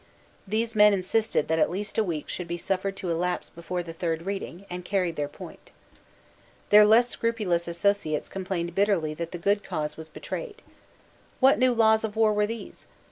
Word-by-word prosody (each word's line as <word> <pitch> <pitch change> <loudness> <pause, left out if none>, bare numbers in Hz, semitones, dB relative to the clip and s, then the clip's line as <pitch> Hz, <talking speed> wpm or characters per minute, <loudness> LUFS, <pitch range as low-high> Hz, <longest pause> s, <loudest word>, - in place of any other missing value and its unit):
These 225 +3 -1
men 210 -1 +7
insisted 195 -2 0
that 160 +1 +1
at - - +3
least 205 +4 -4
a - - +4
week 165 -6 -4
should 180 - -5
be 170 0 -3
suffered 195 +2 -2
to 185 -3 -4
elapse 180 +2 -2
before 175 +1 -4
the 165 -1 -8
third 165 -1 -2
reading, 195 -1 -5
and 180 0 -6
carried 180 -3 -1
their 145 -1 -2
point. 150 - -12 1.0
Their 210 0 +8
less 230 +3 +5
scrupulous 210 -9 -1
associates 170 -3 0
complained 180 -3 -4
bitterly 195 -6 +1
that 165 +2 -5
the 175 - -5
good 200 +4 +1
cause 150 -1 -4
was 160 0 -9
betrayed. 425 - -7 0.8
What 265 +1 +5
new 255 0 +4
laws 220 -1 +4
of 220 -1 -3
war 220 -1 +3
were 210 0 +1
these? 230 +1 -8
190 Hz, 185 wpm, -26 LUFS, 170-215 Hz, 1.0 s, Their